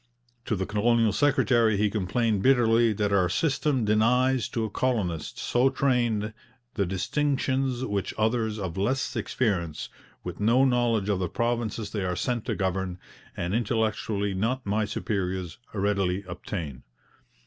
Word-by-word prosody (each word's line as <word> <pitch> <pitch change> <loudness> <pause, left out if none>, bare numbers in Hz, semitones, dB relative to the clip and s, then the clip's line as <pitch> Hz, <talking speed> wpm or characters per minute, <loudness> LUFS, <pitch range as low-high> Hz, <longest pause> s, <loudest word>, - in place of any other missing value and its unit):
To 110 - 0
the 95 -1 -2
colonial 110 +1 +2
secretary 120 -6 +3
he 105 0 +2
complained 105 +1 0
bitterly 115 -2 +4
that 105 -1 0
'our 95 -3 +3
system 135 - +1
denies 125 +4 +2
to 115 - -2
a - - -4
colonist, 100 -12 -1
so 125 +2 +2
trained, 120 -6 0 0.4
the 100 -4 0
distinctions 130 +5 0
which 100 -5 -2
others 110 0 0
of 95 -4 -4
less 130 +7 0
experience, 90 -10 -1 0.3
with 90 -1 -6
no 115 +6 +4
knowledge 120 -5 +2
of 100 -3 +1
the 90 -2 -1
provinces 115 -3 -2
they 105 -3 -2
are 90 -1 -1
sent 120 +4 -2
to - - -1
govern, 95 -1 -2 0.4
and 85 +2 -2
intellectually 110 -3 0
not 115 +7 -1
my 105 +2 +1
superiors, 95 -4 -3
readily 100 -2 0
obtain.' 85 -6 -6
110 Hz, 140 wpm, -27 LUFS, 95-120 Hz, 0.4 s, bitterly